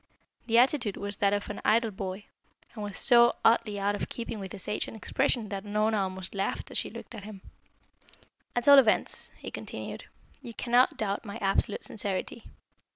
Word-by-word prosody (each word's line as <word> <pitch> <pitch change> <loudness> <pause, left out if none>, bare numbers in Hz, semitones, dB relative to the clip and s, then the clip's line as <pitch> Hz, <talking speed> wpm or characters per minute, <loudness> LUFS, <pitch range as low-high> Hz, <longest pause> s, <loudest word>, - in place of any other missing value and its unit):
The 230 0 +3
attitude 245 -4 +3
was 200 0 -4
that 200 -1 +2
of 205 0 -1
an - - -7
idle 225 +1 +3
boy, 190 +1 -6 0.5
and 215 - -6
was 205 -1 -4
so 240 -1 +6
oddly 225 -3 +3
out 200 +1 +1
of 205 - -4
keeping 230 -2 -5
with 190 -2 -7
his 190 - -7
age 210 - -1
and - - -8
expression 220 +1 0
that 195 -1 -4
Unorna 215 +1 +1
almost 190 -1 -3
laughed 195 -1 -3
as - - 0
she - - -4
looked - - -10
at 215 -3 -8
him. 205 -2 -10 1.1
"At 245 +1 -1
all 280 -1 +10
events," 230 -5 +2
he - - -8
continued, - - -7 0.4
"you 235 -4 -9
cannot 245 +1 +3
doubt 200 -2 -2
my 200 -2 -7
absolute 195 +1 0
sincerity. 205 +2 -2
210 Hz, 185 wpm, -28 LUFS, 200-230 Hz, 1.1 s, all